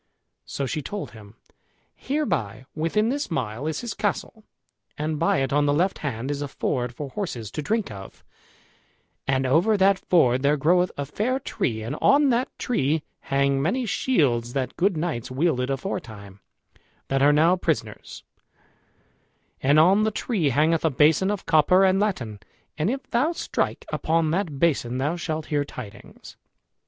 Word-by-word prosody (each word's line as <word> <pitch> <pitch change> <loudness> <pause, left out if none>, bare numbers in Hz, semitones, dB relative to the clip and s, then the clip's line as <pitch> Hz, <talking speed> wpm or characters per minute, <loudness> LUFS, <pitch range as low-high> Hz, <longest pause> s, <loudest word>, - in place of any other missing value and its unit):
So 140 - -3
she 155 +3 -3
told 200 +7 -6
him, 105 -2 -14 0.6
"Hereby, 165 - -2
within 165 +8 0
this 285 +3 -2
mile, 125 - -3
is 160 -1 -2
his 235 -3 -4
castle, 210 +1 -3 0.5
and 150 0 -2
by 165 -4 +2
it 135 0 -1
on 145 0 +3
the 145 - +2
left 180 +5 +1
hand 130 -1 -3
is 145 0 -3
a 145 - -2
ford 125 -2 -2
for 145 0 -6
horses 125 - -5
to 155 - -4
drink 220 - -1
of, 95 -2 -11 1.0
and 130 -1 +1
over 170 +11 +3
that 195 0 +4
ford 130 -8 +3
there 145 +2 +2
groweth 180 +5 +3
a 140 - -2
fair 220 - -1
tree, 110 - -2
and 115 - -4
on 285 0 +5
that 245 +1 +1
tree 155 - 0 0.2
hang 140 0 +1
many 240 - 0
shields 135 - +1
that 130 -2 -2
good 185 -1 +1
knights 155 -8 -3
wielded 130 -1 0
aforetime, 110 - -5 0.7
that 135 0 +1
are 145 +1 +6
now 160 +5 +4
prisoners; 150 - -3 1.4
and 145 +3 +4
on 190 +6 +5
the 215 - +2
tree 205 - -1
hangeth 155 +5 +2
a 160 - +3
basin 155 +7 +3
of 205 -2 -3
copper 180 +4 +4
and 190 0 +3
latten, 130 - -2 0.4
and 160 +5 0
if 270 +3 -4
thou 260 +7 +2
strike - - -2
upon 160 -1 0
that 170 -5 -1
basin 135 -6 +1
thou 145 +6 0
shalt 160 -3 -4
hear 145 -2 0
tidings." 125 -7 -11
155 Hz, 165 wpm, -24 LUFS, 135-190 Hz, 1.4 s, are